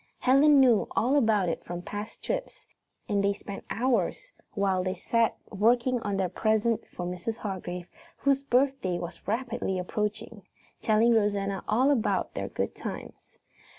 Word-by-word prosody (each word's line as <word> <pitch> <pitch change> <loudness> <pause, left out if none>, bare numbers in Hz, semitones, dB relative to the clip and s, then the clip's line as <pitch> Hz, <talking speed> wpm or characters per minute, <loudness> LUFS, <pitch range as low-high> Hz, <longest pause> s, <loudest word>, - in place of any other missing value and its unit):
Helen 280 +3 +5
knew 245 -5 +5
all 255 +5 +2
about 220 -8 +3
it 165 - -2
from 175 0 -6
past 205 +3 -7
trips, - - -4 0.4
and 200 -1 +1
she 200 0 +2
spent 200 0 -8
hours 260 - 0 0.2
while 195 -3 +1
they 185 0 -2
sat 230 +5 +1
working 240 +5 +2
on 205 -3 -2
their 190 -1 +1
presents 220 +4 0
for 180 - -6
Mrs. 180 +6 -4
Hargrave, 180 -3 -5 0.3
whose 275 -1 +2
birthday 265 -8 +1
was 175 0 -8
rapidly 225 -3 -1
approaching, 210 +3 -3 0.4
telling 225 +2 +4
Rosanna 200 -3 0
all 255 +6 +3
about 245 -7 0
their - - -3
good - - -2
times. - - -8
215 Hz, 150 wpm, -28 LUFS, 195-250 Hz, 0.4 s, Helen